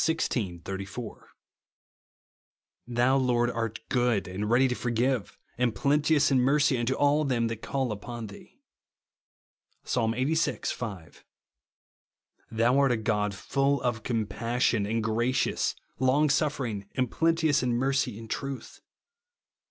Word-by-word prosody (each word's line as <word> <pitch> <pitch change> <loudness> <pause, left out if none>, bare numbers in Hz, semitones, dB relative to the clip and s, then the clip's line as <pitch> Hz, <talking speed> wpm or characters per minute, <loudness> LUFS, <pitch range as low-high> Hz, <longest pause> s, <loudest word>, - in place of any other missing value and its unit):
xvi. 105 - -1
84), 100 +4 -6 0.7
" - - -61
Thou, 125 +2 +2
Lord, 120 -2 +2
art 115 -2 -3
good, 120 -6 +1
and 100 +3 -3
ready 125 +3 +4
to 125 - -1
forgive, 125 -1 -1 0.2
and 120 -3 +1
plenteous 145 +4 +2
in 135 - +4
mercy 140 +1 +3
unto 120 +3 0
all 145 +1 +3
them 125 -5 +1
that 115 -1 -5
call 135 -4 -2
upon 115 +3 -6
thee," 100 -1 -13 1.3
(Psa. - - -1
Ixxxvi. 130 +8 0
5); 100 -9 -8 0.6
" - - -44
thou 115 +4 +3
art 140 -2 +4
a 120 - +2
God 105 -2 -1
full 140 +7 0
of 120 -3 -1
comjMSsion, 115 -1 0
and 115 0 0
gracious, 120 +3 0 0.2
long 135 +4 +3
sufering, 135 -9 -1
and 130 -3 0
plenteous 165 -3 +2
in 125 -1 0
mercy 130 -3 0
and 115 0 -9
truth," 135 +3 -5
(Psa. - - -28
120 Hz, 135 wpm, -28 LUFS, 110-135 Hz, 1.3 s, ready